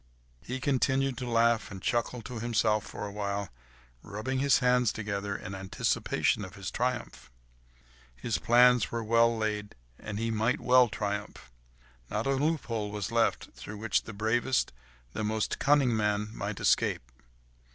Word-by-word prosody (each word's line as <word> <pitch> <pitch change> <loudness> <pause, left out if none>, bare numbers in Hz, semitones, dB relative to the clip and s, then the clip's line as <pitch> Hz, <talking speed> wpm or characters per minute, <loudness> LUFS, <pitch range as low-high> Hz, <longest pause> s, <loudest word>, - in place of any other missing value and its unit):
He 125 - -5
continued 135 0 +1
to 125 -1 -4
laugh 115 -1 +2
and 95 - -8
chuckle 120 +3 -1
to 125 -1 -6
himself 110 -2 +1
for - - -6
a 100 - -6
while, 100 -2 -3 0.5
rubbing 130 +6 -3
his 140 -2 +4
hands 125 -3 +3
together 100 -2 -3
in 95 - -8
anticipation 95 +2 0
of 95 - -9
his 100 -1 -6
triumph. 125 - -3 0.9
His 105 - -2
plans 125 -1 +5
were 115 -1 -2
well 115 +1 +3
laid, 105 -1 -2 0.2
and 105 -1 -6
he 115 +1 -1
might 110 +3 +1
well 125 -1 +5
triumph! 100 - -4 0.6
Not 105 +2 -2
a 135 - +1
loophole 135 -7 -1
was 105 +1 -4
left, 115 -1 +1
through 105 - -9
which 110 -1 +1
the - - -9
bravest, 115 - 0 0.4
the - - -3
most 110 0 -1
cunning 140 -4 +3
man 105 0 0
might - - -4
escape. - - +2
115 Hz, 150 wpm, -29 LUFS, 105-125 Hz, 0.9 s, plans